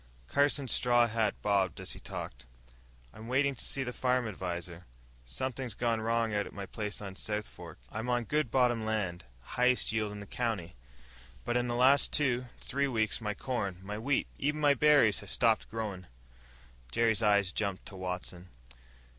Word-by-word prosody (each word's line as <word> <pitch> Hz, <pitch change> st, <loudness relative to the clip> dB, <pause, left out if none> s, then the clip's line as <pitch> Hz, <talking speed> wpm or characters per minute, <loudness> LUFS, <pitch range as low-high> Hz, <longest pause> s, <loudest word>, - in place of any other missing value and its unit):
Carson's 140 Hz, -, +2 dB
straw 120 Hz, -1 st, +4 dB
hat 110 Hz, -2 st, 0 dB
bobbed 100 Hz, -3 st, +1 dB
as -, -, -4 dB
he -, -, -9 dB
talked. -, -, -7 dB, 0.7 s
"I'm 110 Hz, -, -10 dB
waitin' 135 Hz, +3 st, +2 dB
to 130 Hz, -, -6 dB
see 135 Hz, -, -2 dB
the 125 Hz, -1 st, -4 dB
farm 125 Hz, -2 st, +1 dB
adviser. 90 Hz, -, -5 dB, 0.4 s
Somethin's 130 Hz, -, -3 dB
gone 115 Hz, -2 st, 0 dB
wrong 115 Hz, 0 st, +1 dB
out 105 Hz, 0 st, 0 dB
at -, -, -12 dB
my 100 Hz, 0 st, -5 dB
place 105 Hz, 0 st, -5 dB
on 95 Hz, -1 st, -6 dB
the -, -, -13 dB
South 105 Hz, -1 st, -2 dB
Fork. -, -, -11 dB
I'm 110 Hz, +3 st, -4 dB
on 120 Hz, -1 st, +2 dB
good 150 Hz, +2 st, 0 dB
bottom 120 Hz, -2 st, +2 dB
land 95 Hz, -6 st, -2 dB, 0.2 s
highest 125 Hz, -, +2 dB
yield 110 Hz, -1 st, -1 dB
in 105 Hz, -, -7 dB
the 100 Hz, -, -8 dB
county. 110 Hz, -6 st, -2 dB, 0.7 s
But 120 Hz, -, -1 dB
in 125 Hz, 0 st, +2 dB
the 120 Hz, -, -1 dB
last 130 Hz, +3 st, +5 dB
two, 130 Hz, -4 st, +1 dB
three 140 Hz, +1 st, -1 dB
weeks 110 Hz, -3 st, 0 dB
my 105 Hz, -1 st, -2 dB
corn, 110 Hz, -9 st, -2 dB
my 105 Hz, +2 st, -5 dB
wheat, 135 Hz, +5 st, +1 dB
even 150 Hz, +2 st, 0 dB
my 145 Hz, -1 st, +5 dB
berries 140 Hz, -6 st, +5 dB
has 100 Hz, -, -9 dB
stopped 115 Hz, -1 st, +2 dB
growin'!" 105 Hz, -5 st, -4 dB, 0.8 s
Jerry's 115 Hz, -, +3 dB
eyes 100 Hz, -3 st, +3 dB
jumped 100 Hz, -2 st, -2 dB
to 95 Hz, -, -10 dB
Watson. 90 Hz, -1 st, -5 dB
110 Hz, 180 wpm, -31 LUFS, 100-125 Hz, 0.8 s, last